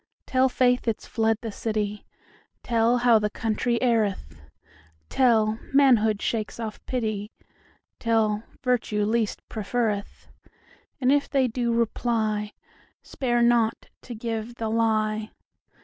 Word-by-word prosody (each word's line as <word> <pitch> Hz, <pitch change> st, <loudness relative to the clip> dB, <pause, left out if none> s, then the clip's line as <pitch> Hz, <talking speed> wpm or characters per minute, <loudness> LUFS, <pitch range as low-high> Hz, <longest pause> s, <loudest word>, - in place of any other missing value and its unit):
Tell 260 Hz, 0 st, +2 dB
faith 250 Hz, -1 st, +2 dB
it's 225 Hz, -, -1 dB
fled 225 Hz, -1 st, +1 dB
the 225 Hz, -, -5 dB
city; 210 Hz, -1 st, -3 dB, 0.6 s
Tell 235 Hz, +1 st, +2 dB
how 240 Hz, -2 st, +5 dB
the 210 Hz, 0 st, -1 dB
country 225 Hz, +3 st, -1 dB
erreth; 205 Hz, -, 0 dB, 0.7 s
Tell, 220 Hz, -4 st, +3 dB, 0.2 s
manhood 220 Hz, -7 st, +4 dB
shakes 220 Hz, 0 st, -2 dB
off 220 Hz, -2 st, -6 dB
pity; 215 Hz, -5 st, -2 dB, 0.7 s
Tell, 220 Hz, -2 st, +1 dB, 0.2 s
virtue 230 Hz, -5 st, 0 dB
least 220 Hz, 0 st, -1 dB
preferreth:And 225 Hz, +4 st, -4 dB
if 285 Hz, 0 st, +2 dB
they 270 Hz, -2 st, +2 dB
do 235 Hz, 0 st, -1 dB
reply, 220 Hz, -2 st, -1 dB, 0.5 s
Spare 240 Hz, -3 st, 0 dB
not 235 Hz, -2 st, +2 dB
to 240 Hz, -, -8 dB
give 225 Hz, +1 st, -4 dB
the 225 Hz, -2 st, -3 dB
lie. 215 Hz, -1 st, 0 dB
225 Hz, 115 wpm, -25 LUFS, 215-240 Hz, 0.7 s, how